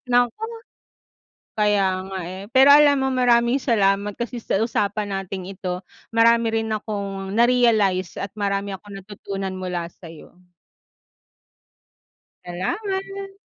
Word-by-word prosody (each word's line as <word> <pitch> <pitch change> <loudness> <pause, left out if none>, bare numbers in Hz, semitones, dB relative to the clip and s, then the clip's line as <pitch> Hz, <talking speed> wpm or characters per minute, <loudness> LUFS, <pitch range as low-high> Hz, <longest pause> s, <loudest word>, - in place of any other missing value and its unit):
Naku! 245 - +2 1.2
Kaya 195 -3 +1
nga, 190 -1 -5
eh. 185 +3 -7
Pero 265 +2 +7
alam 285 -1 +6
mo 265 - +1
maraming 245 0 +3
salamat 205 -5 +1
kasi 240 +2 -5
sa 220 -2 -1
usapan 205 -2 -1
nating 195 -1 -5
ito 185 -1 -5 0.3
marami 230 0 +4
rin 225 0 -1
akong 200 -2 -4
na-realize 225 -6 +3
at 200 - -5
marami 200 0 -1
akong 200 +1 -11
natutunan 195 -1 -6
mula 175 -2 -4
sa'yo. 165 0 -14 2.1
Salamat! 390 - -4
205 Hz, 110 wpm, -22 LUFS, 195-240 Hz, 2.1 s, Pero